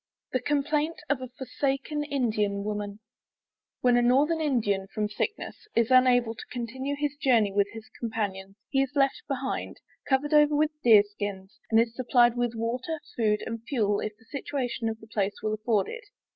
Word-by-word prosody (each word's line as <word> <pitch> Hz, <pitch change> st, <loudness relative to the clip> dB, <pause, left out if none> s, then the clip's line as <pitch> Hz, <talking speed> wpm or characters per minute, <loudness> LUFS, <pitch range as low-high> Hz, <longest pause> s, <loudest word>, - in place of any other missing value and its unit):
THE 255 Hz, -, +1 dB
COMPLAINT 295 Hz, +3 st, 0 dB, 0.2 s
OF 275 Hz, -3 st, 0 dB
A 255 Hz, -, -5 dB
FORSAKEN 275 Hz, +3 st, -2 dB
INDIAN 215 Hz, -8 st, 0 dB
WOMAN 205 Hz, -1 st, -4 dB, 0.9 s
[_When 245 Hz, -1 st, +5 dB
a -, -, +3 dB
Northern 285 Hz, +7 st, +3 dB
Indian, 210 Hz, -10 st, 0 dB
from 210 Hz, +1 st, -2 dB
sickness, 425 Hz, -, -4 dB
is 230 Hz, +1 st, +2 dB
unable 250 Hz, -2 st, +5 dB
to 220 Hz, -, -10 dB
continue 260 Hz, +4 st, -4 dB
his 295 Hz, 0 st, -1 dB
journey 235 Hz, -8 st, +3 dB
with 200 Hz, 0 st, +2 dB
his 225 Hz, -1 st, -9 dB
companions; 195 Hz, -4 st, -3 dB
he 270 Hz, -, +2 dB
is 270 Hz, +1 st, -2 dB
left 275 Hz, -1 st, +2 dB
behind, 270 Hz, -1 st, -3 dB, 0.3 s
covered 285 Hz, +3 st, +2 dB
over 295 Hz, 0 st, +5 dB
with 305 Hz, +1 st, +2 dB
Deer 220 Hz, -4 st, +7 dB
skins, 205 Hz, -1 st, -6 dB
and 225 Hz, -, +5 dB
is 230 Hz, 0 st, +2 dB
supplied 240 Hz, -1 st, +4 dB
with 240 Hz, -1 st, -1 dB
water, 250 Hz, +8 st, -2 dB, 0.2 s
food, 210 Hz, -2 st, +1 dB
and 230 Hz, 0 st, -5 dB
fuel 210 Hz, -8 st, +1 dB
if 210 Hz, -1 st, -4 dB
the 225 Hz, -, -24 dB
situation 250 Hz, -4 st, -3 dB
of 220 Hz, 0 st, -5 dB
the 220 Hz, -, -14 dB
place 205 Hz, -2 st, -1 dB
will 215 Hz, 0 st, 0 dB
afford 215 Hz, -2 st, +1 dB
it. 470 Hz, -1 st, -7 dB
240 Hz, 175 wpm, -27 LUFS, 215-275 Hz, 0.9 s, Deer